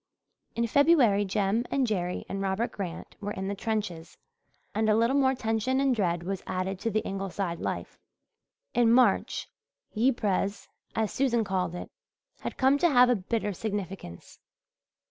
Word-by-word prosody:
In 235 - +1
February 245 -6 +4
Jem 200 +3 +1
and 275 -2 +1
Jerry 180 -5 -2
and 195 - -4
Robert 195 +5 -1
Grant 185 -5 -6
were 205 0 -3
in 190 0 -4
the 200 - -1
trenches 195 -6 -3 0.6
and 215 +1 +1
a 215 - +5
little 230 +4 +3
more 265 -1 +3
tension 225 +2 0
and 270 -2 +3
dread 175 -5 0
was 190 +1 -3
added 185 +1 -2
to 230 - -1
the 215 0 0
Ingleside 195 -2 -3
life. - - -4 0.7
In 235 -2 +4
March 240 -4 +3 0.5
"Yiprez," 215 -4 0 0.3
as 220 -2 0
Susan 240 -4 +2
called 185 -3 -1
it, - - -7 0.5
had - - -6
come 270 +2 +4
to 345 - +4
have 250 -3 +6
a - - +4
bitter 210 +1 -2
significance. 195 - -6
210 Hz, 155 wpm, -28 LUFS, 190-240 Hz, 0.7 s, have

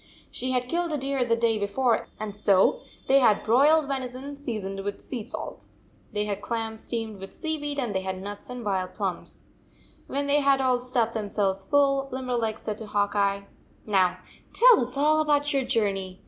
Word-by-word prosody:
She 255 - 0
had 250 -1 0
killed 340 +4 -1
a 300 - 0
deer 270 -1 0
the 230 -1 +2
day 230 -2 +1
before, 225 +4 +1
and 215 -2 -5
so 205 - +3 0.3
they 275 +1 +6
had 220 -6 +4
broiled 285 +6 +4
venison, 265 +1 -4
seasoned 215 -8 -5
with 200 +1 -5
sea 240 -5 -6
salt. - - -4 0.4
They 210 0 -1
had 205 -1 -3
clams 225 -1 -3
steamed 225 -4 -4
with 195 0 -10
sea 315 -1 -2
weed, 290 0 -3
and 245 -6 -1
they 190 - 0
had 190 0 -4
nuts 205 +4 -8
and 250 -2 -6
wild 185 -2 -2
plums. 190 -5 -4 0.7
When 280 +1 -1
they 285 +1 +3
had 275 -1 +3
all 255 -2 +2
stuffed 245 -2 0
themselves 200 -3 -1
full, 275 +2 +2
Limberleg 245 -4 -2
said 215 -1 -5
to 220 - -7
Hawk 205 -1 0
Eye: 200 -1 +1 0.4
"Now 185 -3 +2 0.4
tell - - +7
us 250 +2 -4
all 305 +2 +4
about 295 -1 +1
your 270 -2 +1
journey. 195 -5 -1
235 Hz, 190 wpm, -26 LUFS, 205-275 Hz, 0.7 s, tell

